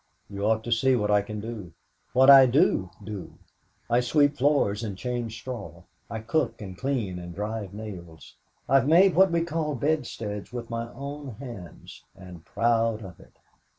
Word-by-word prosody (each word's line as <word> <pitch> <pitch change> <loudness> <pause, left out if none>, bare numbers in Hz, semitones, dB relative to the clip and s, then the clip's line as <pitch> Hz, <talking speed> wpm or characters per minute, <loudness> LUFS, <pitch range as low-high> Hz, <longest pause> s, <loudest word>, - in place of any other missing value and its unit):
You 100 +1 -2
ought 110 0 +1
to 120 - -5
see 130 +3 +3
what 105 -3 0
I 105 0 +4
can 105 +1 -6
do 105 -6 -7 0.4
what 130 +1 +5
I 135 -2 +10
do 120 - +2
do. 105 -3 -7 0.5
I 120 +1 +3
sweep 145 +4 +2
floors 125 -6 +1
and 100 -4 -5
change 120 -1 -3
straw. 125 0 -8 0.3
I 110 -1 -5
cook 135 +3 -1
and 95 -3 -8
clean 105 -5 -2
and 85 -1 -9
drive 105 -1 -4
nails. 90 -7 -10 0.3
I've 135 -1 +4
made 180 +4 +6
what 190 +2 +5
we 170 0 +1
call 160 -3 -2
bedsteads 115 -7 -2
with 120 -1 -6
my 115 0 -4
own 140 -1 -7
hands 105 - -10
and 90 -3 -12
proud 115 +1 +1
of 95 -3 -11
it! - - -19
115 Hz, 170 wpm, -26 LUFS, 105-135 Hz, 0.5 s, I